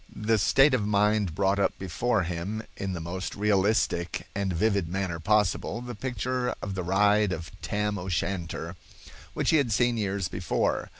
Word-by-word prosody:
The 110 +1 +1
state 135 +7 +5
of 120 -5 +2
mind 105 -3 +2
brought 100 0 +2
up 100 - +1
before 100 +3 0
him 90 +6 -4
in 95 -1 -3
the 85 - -4
most 90 +3 -5
realistic 100 -3 +1
and 100 -1 -1
vivid 100 0 +1
manner 90 -2 -2
possible 105 +3 +1
the 120 0 -6
picture 125 +2 -2
of 100 - -4
the 95 - -3
ride 100 +3 +3
of 80 -3 -5
Tam 105 0 -1
O'Shanter, 90 -1 -3 0.6
which - - +1
he 160 - +5
had 135 -6 +1
seen 120 +2 +2
years 100 -3 -1
before. - - -1
100 Hz, 165 wpm, -27 LUFS, 90-110 Hz, 0.6 s, state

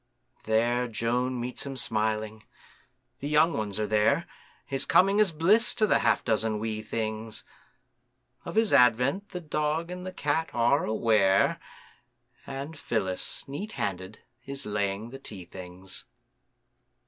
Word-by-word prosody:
There 120 +3 +2
Joan 120 +3 -1
meets 125 +1 -3
him 135 -1 -6
smiling, 110 -1 -1 0.8
the 140 - -4
young 155 +3 +4
ones 105 -1 -3
are 105 - +1
there, 105 0 +2 0.4
His 135 0 -1
coming 195 +3 +4
is 210 -4 +4
bliss 185 +9 +3
to 220 -3 +3
the - - +3
half - - +2
dozen 110 -1 +1
wee 110 0 -3
things; 110 0 -4 1.0
Of - - -7
his 220 -1 +3
advent 125 - +4
the 180 - -5
dog 155 +1 -1
and 180 0 -6
the 185 - -5
cat 160 -1 -1
are 120 +4 +3
aware, 110 -3 +3 0.9
And 140 +3 -6
Phyllis, 95 -8 -2
neat 195 +11 -6
handed, 95 +1 -3 0.3
is 140 +1 -5
laying 105 +2 -2
the 135 - -8
tea 100 -8 -9
things. 90 +1 -9
120 Hz, 135 wpm, -28 LUFS, 110-150 Hz, 1.0 s, young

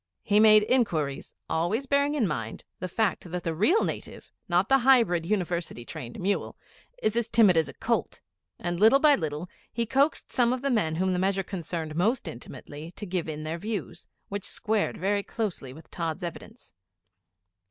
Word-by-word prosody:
He 205 +1 +3
made 215 -1 +7
inquiries, 170 - 0
always 175 +11 0
bearing 280 +2 +2
in 240 -8 +2
mind 115 -9 -4 0.2
the 185 - -3
fact 190 -1 -1
that 180 +1 -4
the 165 - -1
real 265 - +3
native - - -5 0.2
not 175 +2 +3
the 270 0 +5
hybrid, 230 -10 +4
University 175 - -2
trained 125 -6 -8
mule 195 +2 -1 0.5
is 215 - +2
as 235 -1 0
timid 210 -6 +5
as 160 -1 +2
a - - -11
colt, - - -1 0.4
and 175 0 -3
little 220 +6 +7
by 295 +1 +5
little, 155 - -2 0.2
he 235 +1 -1
coaxed 275 +6 +1
some 245 -1 +3
of 255 +1 -4
the 275 - +1
men 165 -10 +1
whom 185 +2 +1
the 180 - 0
measure 195 +1 +1
concerned 165 -4 -5
most 210 +6 +1
intimately 150 +2 -9
to 210 - -6
give 180 -3 -2
in 155 0 -5
their 160 +2 -4
views, 210 +1 -5 0.2
which 200 0 -4
squared 215 -1 -1
very 200 +3 0
closely 195 - -4
with 155 +5 -14
Tods' 165 +1 -3
evidence. 215 +7 -8
190 Hz, 180 wpm, -27 LUFS, 165-225 Hz, 0.5 s, made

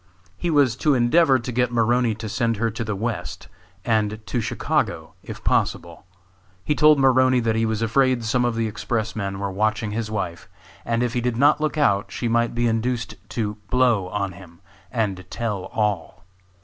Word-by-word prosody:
He 175 - -3
was 140 -7 +3
to 150 0 +2
endeavor 130 +4 +4
to 125 +1 -5
get 125 0 +1
Maroney 120 0 +2
to 110 +1 -6
send 115 0 0
her 115 +1 0
to 115 +2 -4
the 105 -2 -3
west, 110 0 -4 0.4
and 110 -2 +1
to 120 - -2
Chicago, - - -2
if - - -9
possible. - - -1 0.6
He - - +2
told 150 0 +5
Maroney 130 -1 +4
that 115 -1 0
he 115 0 +1
was 110 0 -1
afraid 130 +1 +2
some 125 +2 +1
of 120 -1 0
the 115 0 0
express 110 +1 -3
men 100 -2 -3
were 100 0 -3
watching 110 +2 -1
his 110 0 -3
wife, 95 -5 -4 0.4
and 115 +1 0
if 120 -1 -1
he 120 - 0
did 120 -1 -1
not 145 +3 +4
look 155 0 -1
out 100 -9 +2
she 120 - -3
might 120 0 +1
be 120 0 +1
induced 115 0 -1 0.2
to 105 -3 -3
"blow" 120 -7 +2
on 100 +1 -2
him 90 -1 -15 0.3
and 100 -6 -1
tell 105 -5 -3
all. 95 -4 -2
115 Hz, 190 wpm, -23 LUFS, 105-125 Hz, 0.6 s, told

